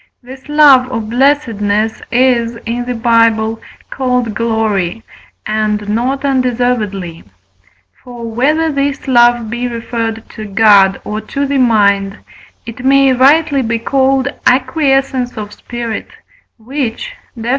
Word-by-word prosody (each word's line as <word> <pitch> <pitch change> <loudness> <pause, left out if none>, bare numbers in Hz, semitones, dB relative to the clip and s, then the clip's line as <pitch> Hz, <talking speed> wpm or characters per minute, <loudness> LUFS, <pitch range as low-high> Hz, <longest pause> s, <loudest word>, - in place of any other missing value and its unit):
This 260 +3 -13
love 280 -4 +5
or 240 - -2
blessedness 225 -3 0
is, 240 -2 +2
in 240 +1 -3
the 250 0 -3
Bible, 225 -1 +1 0.3
called 250 -4 -1
Glory, 220 -3 -1 0.4
and 215 -1 -1
not 255 +6 -1
undeservedly. 245 -9 -1 0.8
For 245 -2 -10
whether 300 +8 0
this 280 0 -2
love 240 -2 +3
be 240 +1 -2
referred 230 -1 -4
to 215 - -9
God 200 -2 +4
or 215 +1 -4
to 275 +6 -3
the 280 0 -1
mind, 200 -4 +2 0.5
it 230 +2 -9
may 270 0 +4
rightly 280 +2 +3
be 230 -1 -1
called 265 +2 +1 0.2
acquiescence 265 -2 +1
of 210 -1 -6
spirit, 235 0 -6 0.5
which 260 - -4 0.3
(Def. 230 +1 -4
240 Hz, 120 wpm, -14 LUFS, 220-265 Hz, 0.8 s, love